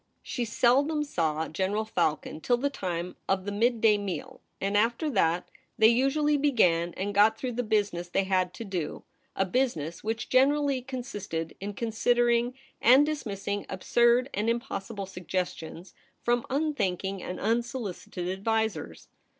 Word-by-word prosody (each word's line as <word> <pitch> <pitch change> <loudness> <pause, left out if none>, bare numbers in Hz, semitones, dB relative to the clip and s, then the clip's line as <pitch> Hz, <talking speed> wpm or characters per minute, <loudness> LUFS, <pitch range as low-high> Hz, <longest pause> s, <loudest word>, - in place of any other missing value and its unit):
She 245 -3 -3
seldom 275 +7 +2
saw 160 - -1
General 195 +6 -1
Falcon 160 -6 -1
till 245 +6 +2
the 280 +3 -1
time 180 -6 -4
of 190 -1 +1
the 205 - -2
midday 220 0 +3
meal, 205 +7 -5 0.2
and 200 +1 -1
after 235 +8 +2
that 175 -5 +1 0.3
they 220 0 +7
usually 280 +5 +2
began 180 - +2
and 200 +2 -2
got 210 +2 +5
through 255 +1 -3
the 245 +1 -1
business 205 -6 0
they 195 - +1
had 185 -1 +1
to 230 - -6
do 180 -6 -4 0.2
— - - -42
a 195 - +1
business 180 - -1
which 225 +1 -2
generally 275 +1 +3
consisted 205 -11 -5
in 200 +1 -5
con 230 +2 -2
i6o 220 - -7
THE 240 - +4
REBEL 235 0 +3
ROSE. 250 - -8 0.3
sideringand 260 +5 +7
dismissing 205 -9 -3
absurd 240 +6 +3
and 210 +3 0
impossible 230 -4 -3
suggestions 180 -2 -5 0.3
from 240 0 +1
unthinking 195 - -1
and 180 - -5
unsolicited 225 -5 -2
advisers. 195 - -2
215 Hz, 155 wpm, -28 LUFS, 185-245 Hz, 0.3 s, they